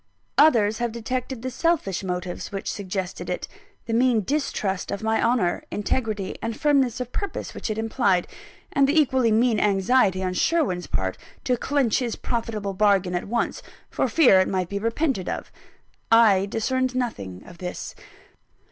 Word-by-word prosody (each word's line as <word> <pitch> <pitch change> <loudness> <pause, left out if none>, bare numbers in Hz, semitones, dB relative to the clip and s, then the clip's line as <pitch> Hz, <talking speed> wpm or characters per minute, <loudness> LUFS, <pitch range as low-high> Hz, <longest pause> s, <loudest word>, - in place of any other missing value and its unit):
Others 220 -8 +5
have 240 -1 -1
detected 245 +2 -4
the 260 - -3
selfish 290 - 0
motives 180 0 -4
which 195 0 -3
suggested 190 -2 -4
it: - - -3 0.4
the 230 - -3
mean 235 -2 +3
distrust 205 -7 -2
of 200 - -4
my 220 0 +1
honour, 230 -7 +1
integrity, 210 -2 -2
and 225 -1 -4
firmness 270 -5 +2
of 250 -1 -5
purpose 400 - -4
which - - -5
it 215 - -2
implied; 220 -5 +1 0.5
and 275 -1 +4
the 315 +2 +4
equally 260 -5 +3
mean 225 0 +3
anxiety 195 -1 +2
on 185 0 -1
Sherwin's 185 - +1
part 95 -1 -2 0.2
to 250 - +1
clench 260 -2 +1
his 240 -3 -2
profitable 220 -4 -3
bargain 195 -2 +2
at 175 +2 -2
once, 235 +2 -1 0.3
for - - 0
fear 255 -12 +5
it 185 - +3
might 185 -2 -1
be 200 - -2
repented 230 - -1
of. - - -5 0.6
I 210 -4 +5
discerned 255 +4 -1
nothing 100 - -3
of 170 -1 -13
this. 180 -1 -5
220 Hz, 160 wpm, -24 LUFS, 190-255 Hz, 0.6 s, Others